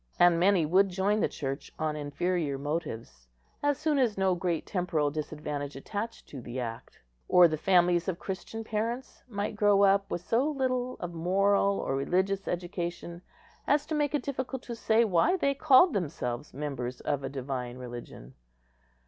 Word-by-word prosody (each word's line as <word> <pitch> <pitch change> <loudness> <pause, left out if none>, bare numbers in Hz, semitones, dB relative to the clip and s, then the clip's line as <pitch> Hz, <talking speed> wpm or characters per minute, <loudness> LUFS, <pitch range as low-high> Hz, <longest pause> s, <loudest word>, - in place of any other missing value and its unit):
And 175 -1 +5
many 185 -2 +4
would 190 +5 +4
join 195 +3 +1
the - - +2
Church 135 -1 -5
on 155 -1 -1
inferior 150 0 -1
motives 135 - -5 0.3
as 290 -1 +1
soon 305 -2 +1
as 235 -6 +1
no 190 -1 +2
great 175 -2 -1
temporal 165 -6 0
disadvantage 150 -1 -4
attached 210 +11 -5
to 135 - -8
the 120 +2 -6
act; 115 -2 -6 0.3
or 180 -1 +7
the 155 - -1
families 175 +1 +3
of 185 -3 -1
Christian 195 +5 -6
parents 230 +4 -3
might 205 -2 -3
grow 205 -1 +4
up 195 0 +4
with 175 - -3
so 235 +10 +1
little 255 -3 -1
of 175 -1 -5
moral 195 +4 +2
or 135 - -2
religious 190 +7 0
education 175 -1 -4 0.5
as 290 0 +3
to 315 - -4
make 295 -1 +1
it 295 - -1
difficult 265 -1 -4
to 235 - -6
say 230 0 +3
why 220 - +3
they 280 -5 +1
called 280 +3 +5
themselves 145 -8 -3
members 130 -3 -5
of 140 -2 -1
a 135 - -3
divine 130 -2 -4
religion. 120 - -9
180 Hz, 165 wpm, -29 LUFS, 145-215 Hz, 0.5 s, or